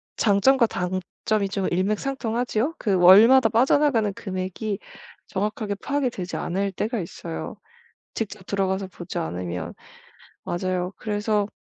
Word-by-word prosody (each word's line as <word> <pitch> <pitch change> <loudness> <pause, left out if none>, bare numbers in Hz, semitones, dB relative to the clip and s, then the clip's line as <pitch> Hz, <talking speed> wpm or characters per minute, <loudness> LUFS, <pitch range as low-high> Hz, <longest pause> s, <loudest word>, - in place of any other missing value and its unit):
장점과 235 +5 +4
단점이 185 +2 -2
좀 195 -1 -1
일맥상통하지요? 235 - -1
그 205 - 0
월마다 215 +7 +7
빠져나가는 235 -2 +3
금액이 190 +2 -4 0.5
정확하게 210 +1 -2
파악이 285 -2 0
되지 185 -6 -5
않을 195 +3 -1
때가 220 +5 -2
있어요. 165 -1 -7 0.6
직접 210 -3 -5
들어가서 195 0 -1
보지 180 -2 -8
않으면. 85 0 -4 0.7
맞아요. 180 +1 -2
그래서 210 -1 0
200 Hz, 305 characters per minute, -24 LUFS, 185-225 Hz, 0.7 s, 월마다